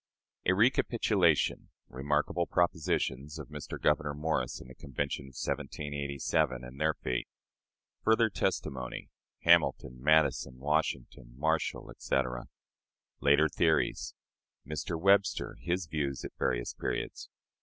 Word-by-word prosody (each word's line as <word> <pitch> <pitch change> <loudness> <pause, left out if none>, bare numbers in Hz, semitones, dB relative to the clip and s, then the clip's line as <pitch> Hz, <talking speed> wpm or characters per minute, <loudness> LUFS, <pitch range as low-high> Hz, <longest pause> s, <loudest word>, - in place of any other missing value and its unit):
A 95 - +5
Recapitulation. 105 - +3 0.2
Remarkable 75 +6 0
Propositions 80 -4 0
of 75 -3 -8
Mr. 75 -1 -7
Gouverneur 75 -1 +1
Morris 75 -4 -1
in - - -11
the 65 - -11
Convention 70 +1 -4
of 65 -2 -13
1787, 70 -3 -1
and 65 +4 -9
their 80 0 +2
Fate. 60 -1 -2 0.8
Further 110 0 +4
Testimony. 65 -11 -2 0.3
Hamilton, 65 -1 +3
Madison, 75 -3 +3
Washington, 65 -4 -2
Marshall, 80 +2 -1
etc. 60 -2 -1 0.7
Later 70 +2 +5
Theories. 75 - +1 0.5
Mr. 75 +3 -3
Webster: 100 +2 +3
his 90 0 -1
Views 75 -3 -2
at - - -6
Various - - 0
Periods. - - -4
75 Hz, 110 wpm, -31 LUFS, 65-80 Hz, 0.8 s, A